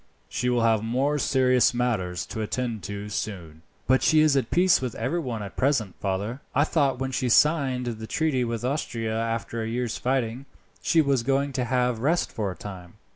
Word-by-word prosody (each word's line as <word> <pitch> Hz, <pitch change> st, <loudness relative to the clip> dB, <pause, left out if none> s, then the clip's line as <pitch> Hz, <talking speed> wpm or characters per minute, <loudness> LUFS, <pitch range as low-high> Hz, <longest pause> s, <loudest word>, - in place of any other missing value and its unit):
She 125 Hz, -, -1 dB
will 120 Hz, -1 st, +2 dB
have 110 Hz, -2 st, +3 dB
more 135 Hz, +6 st, 0 dB
serious 130 Hz, -3 st, +3 dB
matters 105 Hz, -8 st, -1 dB
to 110 Hz, -, -5 dB
attend 115 Hz, 0 st, -2 dB
to 100 Hz, +1 st, -5 dB
soon." 90 Hz, -7 st, -5 dB, 0.2 s
"But 130 Hz, +1 st, +3 dB
she 155 Hz, -1 st, +4 dB
is 155 Hz, -2 st, +4 dB
at 130 Hz, -4 st, +1 dB
peace 180 Hz, -2 st, +4 dB
with 125 Hz, -3 st, -3 dB
every 130 Hz, +10 st, -1 dB
one 120 Hz, -8 st, -4 dB
at 100 Hz, -, -8 dB
present, 130 Hz, -8 st, +1 dB
father. 100 Hz, +7 st, -3 dB
I 145 Hz, -, +5 dB
thought 145 Hz, -4 st, +1 dB
when 135 Hz, +1 st, -3 dB
she 130 Hz, -1 st, -1 dB
signed 135 Hz, -2 st, +3 dB
the 110 Hz, -2 st, -5 dB
treaty 150 Hz, -4 st, 0 dB
with 115 Hz, 0 st, -3 dB
Austria 115 Hz, -5 st, -2 dB
after 115 Hz, 0 st, -2 dB
a 110 Hz, -, -3 dB
year's 120 Hz, 0 st, -2 dB
fighting, 130 Hz, 0 st, -1 dB, 0.3 s
she 165 Hz, -, +3 dB
was 140 Hz, -4 st, +1 dB
going 135 Hz, +3 st, 0 dB
to 125 Hz, -2 st, -1 dB
have 125 Hz, -1 st, +1 dB
rest 155 Hz, +8 st, +1 dB
for 105 Hz, -5 st, -2 dB
a 90 Hz, -, -6 dB
time." 90 Hz, -3 st, -9 dB
125 Hz, 195 wpm, -25 LUFS, 110-135 Hz, 0.3 s, I